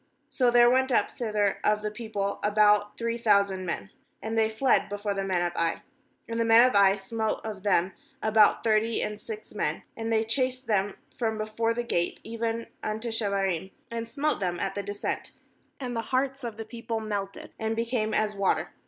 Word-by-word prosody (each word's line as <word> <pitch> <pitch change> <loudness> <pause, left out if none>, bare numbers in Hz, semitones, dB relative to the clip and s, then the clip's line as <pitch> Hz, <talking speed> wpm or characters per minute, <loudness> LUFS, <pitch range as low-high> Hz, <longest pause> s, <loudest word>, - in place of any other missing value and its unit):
*So 250 -2 +3
there 240 0 +6
went 260 +2 +3
up - - +2
thither 210 -4 0
of 210 0 +2
the 210 - -2
people 210 -3 -3
about 210 0 +3
three 230 0 -2
thousand 200 -4 +2
men, 100 -12 -4 0.3
and 220 +1 -4
they 220 -1 +3
fled 245 +4 +2
before 205 0 -2
the 195 0 -2
men 185 -2 0
of 175 0 -1
Ai 165 0 0 0.4
5And 230 0 -3
the - - +3
men 230 +2 +7
of 255 - -1
Ai 195 -1 +6
smote 220 +2 -2
of 215 -3 -6
them 190 -2 +2 0.3
about 220 -1 +4
thirty 225 0 +2
and 210 0 -4
six 440 -1 -8
men; - - -2
and 225 0 -3
they 220 -1 +3
chased 255 +3 0
them 205 -2 0 0.2
from 220 -2 -1
before 220 +2 -1
the 240 - -1
gate 175 -7 -1
even 230 0 -3 0.2
unto 220 +2 -3
Shebarim, 195 -5 -1 0.2
and 230 0 -4
smote 300 +5 0
them 175 -3 -2
at - - -1
the 200 - -3
descent; 205 +1 -4 0.5
and 250 -3 -4
the 230 - 0
hearts 265 +3 -1
of 230 -3 -5
the 225 - -6
people 230 0 -4
melted, 205 -2 -5
and 220 0 -1
became 230 -1 -1
as 215 0 +1
water. 200 -1 0
220 Hz, 195 wpm, -27 LUFS, 200-230 Hz, 0.5 s, men